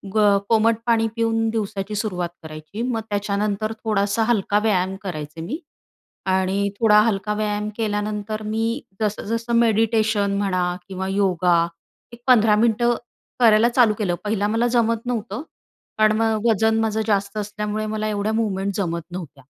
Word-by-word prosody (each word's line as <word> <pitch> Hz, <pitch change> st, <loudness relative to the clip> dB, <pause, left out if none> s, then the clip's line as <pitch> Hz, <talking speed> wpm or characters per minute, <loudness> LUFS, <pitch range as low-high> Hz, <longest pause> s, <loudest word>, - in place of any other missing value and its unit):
ग 205 Hz, -2 st, +5 dB
कोमट 225 Hz, 0 st, +4 dB
पाणी 225 Hz, -1 st, +3 dB
पिऊन 225 Hz, -1 st, +1 dB
दिवसाची 210 Hz, -2 st, -3 dB
सुरुवात 180 Hz, -5 st, -2 dB
करायची. 155 Hz, +7 st, -8 dB
मग 240 Hz, -2 st, -1 dB
त्याच्यानंतर 205 Hz, +1 st, -1 dB
थोडासा 210 Hz, 0 st, +1 dB
हलका 210 Hz, -3 st, +2 dB
व्यायाम 190 Hz, -3 st, +1 dB
करायचे 155 Hz, -3 st, -6 dB
मी 225 Hz, -, -4 dB, 0.8 s
आणि 190 Hz, +2 st, +1 dB
थोडा 210 Hz, -2 st, +6 dB
हलका 210 Hz, -1 st, 0 dB
व्यायाम 210 Hz, 0 st, -1 dB
केल्यानंतर 215 Hz, 0 st, -2 dB
मी 225 Hz, +4 st, -1 dB, 0.2 s
जसं, 210 Hz, -1 st, -1 dB
जसं 230 Hz, +2 st, -2 dB
मेडिटेशन 220 Hz, -2 st, +2 dB
म्हणा 185 Hz, -3 st, 0 dB
किंवा 190 Hz, 0 st, -4 dB
योगा 180 Hz, -3 st, +2 dB, 0.5 s
एक 235 Hz, -, -12 dB
15 225 Hz, -4 st, +5 dB
मिनिटे 230 Hz, +2 st, +2 dB, 0.5 s
करायला 230 Hz, -1 st, +5 dB
चालू 235 Hz, -3 st, +4 dB
केलं. 180 Hz, -5 st, 0 dB
पहिला 205 Hz, -1 st, 0 dB
मला 225 Hz, +3 st, +1 dB
जमत 230 Hz, -1 st, +1 dB
नव्हतं 240 Hz, +1 st, -3 dB, 0.6 s
कारण 215 Hz, 0 st, +4 dB
मग 225 Hz, 0 st, +1 dB
वजन 220 Hz, +1 st, +2 dB
माझं 220 Hz, 0 st, 0 dB
जास्त 200 Hz, 0 st, 0 dB
असल्यामुळे 210 Hz, +1 st, -3 dB
मला 215 Hz, 0 st, -2 dB
एवढ्या 210 Hz, +1 st, -1 dB
मूव्हमेंट 200 Hz, -3 st, -1 dB
जमत 170 Hz, -4 st, -1 dB
नव्हत्या. 160 Hz, -7 st, -8 dB
210 Hz, 145 wpm, -22 LUFS, 200-225 Hz, 0.8 s, थोडा